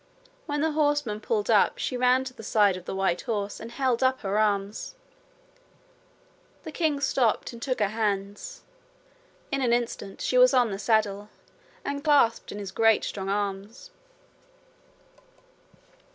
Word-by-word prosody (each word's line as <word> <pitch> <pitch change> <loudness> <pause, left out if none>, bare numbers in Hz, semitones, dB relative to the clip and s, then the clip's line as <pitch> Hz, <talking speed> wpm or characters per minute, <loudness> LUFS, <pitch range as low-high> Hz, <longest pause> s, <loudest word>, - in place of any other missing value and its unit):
When 290 -1 -1
the 320 0 +1
horsemen 290 -8 0
pulled 420 - -1
up - - +4
she 255 - -3
ran 250 +1 +3
to 260 -1 -8
the - - -11
side 205 -3 +3
of 185 -1 -9
the - - -5
white 190 -2 0
horse 205 -3 -3
and 230 +1 -8
held 255 -1 0
up 260 0 +2
her 200 0 -1
arms. 205 - -1 1.7
The 315 - -7
king 305 -2 0
stopped 250 -5 0
and 235 - -11
took 255 -1 -1
her 205 -2 +2
hands. 205 - -3 0.9
In 275 -1 0
an 240 -2 +2
instant 235 -4 -3
she 250 - +1
was 255 +1 +6
on 245 -4 +3
the 195 - -4
saddle 210 -2 0 0.6
and 280 0 -3
clasped 285 -7 +3
in - - -7
his 200 -2 -6
great 225 0 +3
strong 195 -1 -4
arms. 205 - -4
230 Hz, 150 wpm, -26 LUFS, 205-265 Hz, 1.7 s, was